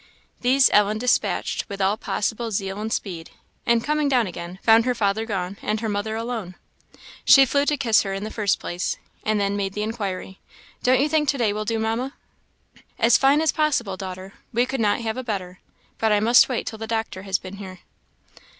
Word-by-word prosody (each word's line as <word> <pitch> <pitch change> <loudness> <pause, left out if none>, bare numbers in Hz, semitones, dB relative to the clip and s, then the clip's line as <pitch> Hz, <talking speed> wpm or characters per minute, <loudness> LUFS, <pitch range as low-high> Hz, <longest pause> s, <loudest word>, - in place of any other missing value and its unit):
These 260 +2 +4
Ellen 210 +1 +4
despatched 245 0 0
with 200 -1 -6
all 195 +1 +2
possible 225 +2 -2
zeal 195 -1 -3
and 220 +1 -4
speed; 170 -7 -4 0.4
and 235 -1 +3
coming 300 0 +1
down 250 -4 +3
again, 175 -1 -7
found 225 0 +6
her 250 -1 +1
father 220 0 0
gone, 195 -2 -3
and 215 +1 -1
her 225 - -2
mother 205 +2 -2
alone. 225 -5 -4 0.7
She 275 -1 +8
flew 280 +2 +1
to 295 - +2
kiss 230 -5 +3
her 195 - -4
in 195 +1 -4
the 215 - -5
first 210 -3 0
place, 175 +1 -3 0.3
and 215 -1 +1
then 200 0 0
made 195 -1 -2
the 210 - -2
inquiry, 200 -4 -4 0.4
"Don't 255 0 +3
you 290 - +3
think 300 -1 +1
to 280 - +1
day 220 -5 +1
will 215 +1 -3
do, 225 +1 -1
Mamma?" 225 +5 -2 0.8
"As 230 0 +4
fine 275 +3 +4
as 320 - +3
possible, 265 -11 0
daughter; 185 0 -7 0.2
we 240 +1 +2
could 265 -1 -3
not 210 +1 +1
have 225 +1 -3
a 255 - -4
better; 185 -6 -5 0.4
but 220 -1 +2
I 210 - +4
must 235 +5 +5
wait 250 - -2
till 220 -1 -6
the 225 - -5
doctor 225 -4 -3
has 195 -1 0
been 190 +1 -10
here." 185 -2 -9
220 Hz, 205 wpm, -23 LUFS, 195-240 Hz, 0.8 s, She